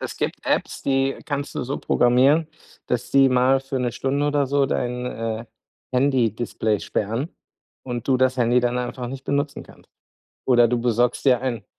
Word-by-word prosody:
Es -, -, -6 dB
gibt -, -, -3 dB
Apps, -, -, -1 dB
die 135 Hz, 0 st, +1 dB
kannst 145 Hz, -1 st, -4 dB
du -, -, -2 dB
so 135 Hz, +3 st, -3 dB
programmieren, 135 Hz, +6 st, +3 dB, 0.4 s
dass 125 Hz, 0 st, -2 dB
die 135 Hz, -1 st, +5 dB
mal 130 Hz, +1 st, +3 dB
für 135 Hz, 0 st, -4 dB
'ne 120 Hz, -2 st, -1 dB
Stunde 140 Hz, +4 st, -1 dB
oder 145 Hz, -1 st, +1 dB
so 140 Hz, 0 st, +2 dB
dein, 125 Hz, -1 st, -2 dB
äh, 115 Hz, -1 st, -4 dB, 0.5 s
Handy-Display 120 Hz, -5 st, +1 dB
sperren 115 Hz, +9 st, -2 dB, 0.6 s
und 120 Hz, -3 st, -5 dB
du 130 Hz, -, +4 dB
das 130 Hz, 0 st, +2 dB
Handy 120 Hz, 0 st, +3 dB
dann 125 Hz, 0 st, 0 dB
einfach 125 Hz, 0 st, -4 dB
nicht 135 Hz, +1 st, -8 dB
benutzen 140 Hz, 0 st, -2 dB
kannst. -, -, -18 dB, 0.6 s
Oder 120 Hz, -2 st, +5 dB
du 120 Hz, +1 st, 0 dB
besorgst 120 Hz, +2 st, 0 dB
dir 125 Hz, -3 st, +4 dB
einen 125 Hz, -4 st, -3 dB
125 Hz, 175 wpm, -23 LUFS, 120-135 Hz, 0.6 s, die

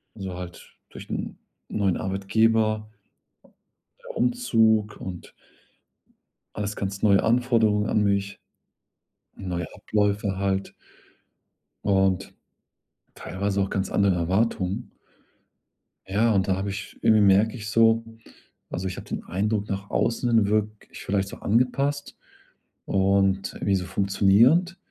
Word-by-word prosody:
also 95 Hz, -3 st, -6 dB
halt 90 Hz, -1 st, -10 dB
durch -, -, -11 dB
'n -, -, -4 dB, 0.3 s
neuen 100 Hz, -4 st, 0 dB
Arbeitgeber 110 Hz, +2 st, +1 dB, 1.2 s
Umzug 110 Hz, -, +2 dB
und 90 Hz, -2 st, -8 dB, 1.2 s
alles 105 Hz, 0 st, -3 dB
ganz 100 Hz, 0 st, -4 dB
neue 100 Hz, -2 st, +4 dB
Anforderungen 115 Hz, -3 st, +2 dB
an 105 Hz, -, +2 dB
mich, 100 Hz, -1 st, -1 dB, 1.0 s
neue 90 Hz, -2 st, -4 dB
Abläufe 105 Hz, -1 st, -1 dB
halt 95 Hz, 0 st, -1 dB, 1.1 s
und 95 Hz, -1 st, +1 dB, 0.8 s
teilweise 100 Hz, +3 st, -3 dB
auch 95 Hz, -, -2 dB
ganz 95 Hz, -1 st, -2 dB
andere 100 Hz, -2 st, +2 dB
Erwartungen. 95 Hz, +2 st, -1 dB, 1.2 s
Ja, 110 Hz, +4 st, +2 dB
und 95 Hz, -3 st, +1 dB
da 95 Hz, -, +2 dB
habe 95 Hz, +2 st, -3 dB
ich 100 Hz, 0 st, -7 dB
irgendwie 110 Hz, -1 st, +5 dB
merke 100 Hz, +3 st, +4 dB
ich 105 Hz, -3 st, -6 dB
so 115 Hz, 0 st, +4 dB, 0.7 s
also 95 Hz, +2 st, -3 dB
ich 95 Hz, -, -5 dB
habe -, -, -9 dB
den -, -, -4 dB
Eindruck 105 Hz, +2 st, -1 dB
nach 100 Hz, 0 st, -4 dB
außen 115 Hz, -2 st, +1 dB
wirke 105 Hz, 0 st, +1 dB, 0.2 s
ich -, -, -10 dB
vielleicht 95 Hz, 0 st, -1 dB
so -, -, -9 dB
angepasst 135 Hz, +6 st, 0 dB, 0.7 s
und 95 Hz, 0 st, +1 dB
wie 100 Hz, -, +2 dB
so 90 Hz, -1 st, -2 dB
funktionierend, 105 Hz, -, +3 dB
100 Hz, 115 wpm, -25 LUFS, 95-110 Hz, 1.2 s, irgendwie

